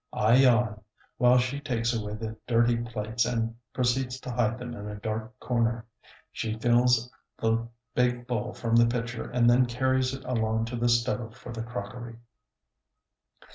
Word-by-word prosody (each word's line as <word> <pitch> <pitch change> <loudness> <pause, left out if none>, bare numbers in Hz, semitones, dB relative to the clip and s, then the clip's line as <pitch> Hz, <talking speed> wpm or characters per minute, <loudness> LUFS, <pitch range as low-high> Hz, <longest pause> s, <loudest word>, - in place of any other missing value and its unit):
I 115 +3 +4
yawn, 120 -5 +4 0.4
while 125 0 +6
she 125 +3 0
takes 120 -5 -1
away 105 -2 -3
the 110 0 -5
dirty 120 0 +3
plates 115 0 -2
and 115 -2 -1 0.2
proceeds 125 +1 0
to 125 - -5
hide 120 -1 +1
them 125 -1 -6
in 105 -3 -7
a 105 - -5
dark 110 +2 -5
corner. 115 -2 0 0.5
She 110 -1 -3
fills 120 +1 +3 0.3
the 115 +1 0 0.3
big 125 -1 +1
bowl 125 -1 -2
from 115 -1 0
the 115 0 +6
pitcher 115 -1 -3
and 120 -1 +2
then 125 +1 +5
carries 130 +1 +1
it 135 - -11
along 110 -2 0
to 120 +2 -5
the 120 0 +1
stove 120 -1 0
for 120 - -9
the 115 - -4
crockery. 115 +1 -6
120 Hz, 165 wpm, -28 LUFS, 115-125 Hz, 0.5 s, while